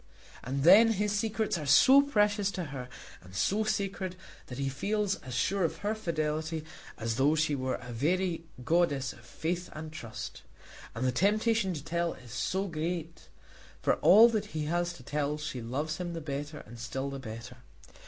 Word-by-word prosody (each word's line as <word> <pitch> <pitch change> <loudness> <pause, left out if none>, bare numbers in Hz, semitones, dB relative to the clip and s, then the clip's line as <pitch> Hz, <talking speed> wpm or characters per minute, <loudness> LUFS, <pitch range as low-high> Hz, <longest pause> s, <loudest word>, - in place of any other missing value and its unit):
And 135 +2 -2
then 215 +7 +8
his 210 0 0
secrets 215 -3 0
are 150 - -5
so 260 - +8
precious 210 -7 +2
to 180 - -3
her 125 -2 -6 0.3
and 95 +1 -14
so 205 - +1
sacred, 195 -3 -2 0.3
that 125 - -7
he 140 0 -1
feels 200 +9 -1
as 125 -1 -8
sure 195 +9 +1
of 165 0 0
her 210 - +2
fidelity 160 -5 -2 0.3
as 115 0 -2
though 145 +4 +4
she 155 -1 +1
were 130 -2 -1
a 125 -1 -8
very 170 +6 0 0.2
goddess 145 -6 +2
of - - -16
faith 170 +8 -4
and 155 0 -7
trust. 115 -8 -7 0.5
And 120 +3 -2
the 130 - +3
temptation 210 - +2
to 145 - -6
tell 170 0 -1
is 125 -2 -14
so 190 +9 -1
great. 165 0 -4 0.5
For - - +3
all 215 +5 +8
that 220 -3 -1
he 150 - -1
has 175 +2 0
to 140 - -13
tell 145 +2 -1
she 150 -5 -5
loves 145 +7 -3
him 175 -1 -4
the 165 - -4
better 145 0 -5
and 115 +2 -11
still 135 +3 -4
the 135 - -5
better. 115 0 -8
160 Hz, 185 wpm, -30 LUFS, 135-195 Hz, 0.5 s, then